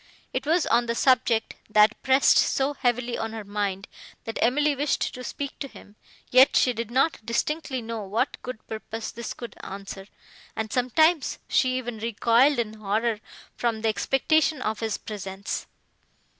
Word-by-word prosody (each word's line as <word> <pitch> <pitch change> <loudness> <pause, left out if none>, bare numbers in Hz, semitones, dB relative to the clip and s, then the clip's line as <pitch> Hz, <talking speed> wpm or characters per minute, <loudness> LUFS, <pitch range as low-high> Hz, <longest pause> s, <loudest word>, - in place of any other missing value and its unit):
It 260 +2 -3
was 330 +1 +3
on 240 0 +2
the 235 - -1
subject, 240 -3 +2 0.2
that 215 +1 +4
pressed 265 +1 +5
so 275 +2 +2
heavily 245 -2 -1
on 225 0 -3
her 220 -1 -5
mind, 200 -1 -3 0.4
that 225 - -5
Emily 290 +5 +3
wished 285 +2 0
to 250 - -8
speak 280 +2 -5
to 275 - -4
him, 205 -5 -15 0.4
yet 255 +2 +6
she 250 - +4
did 230 -1 -4
not 265 +1 +1
distinctly 265 +3 -2
know 225 -1 -4
what 215 +7 -2
good 250 -3 -7
purpose 220 0 -6
this 235 -1 -6
could 235 - -8
answer, 195 0 -8 0.5
and 220 0 -3
sometimes 310 +5 +2
she 255 -1 +2
even 245 -3 -5
recoiled 235 +5 +3
in 225 -2 -1
horror 215 +1 -1 0.4
from 230 -2 -1
the 225 - +3
expectation 300 +6 +2
of 220 -4 -2
his 220 -3 -2
presence. 195 -2 -5
235 Hz, 160 wpm, -26 LUFS, 220-265 Hz, 0.5 s, yet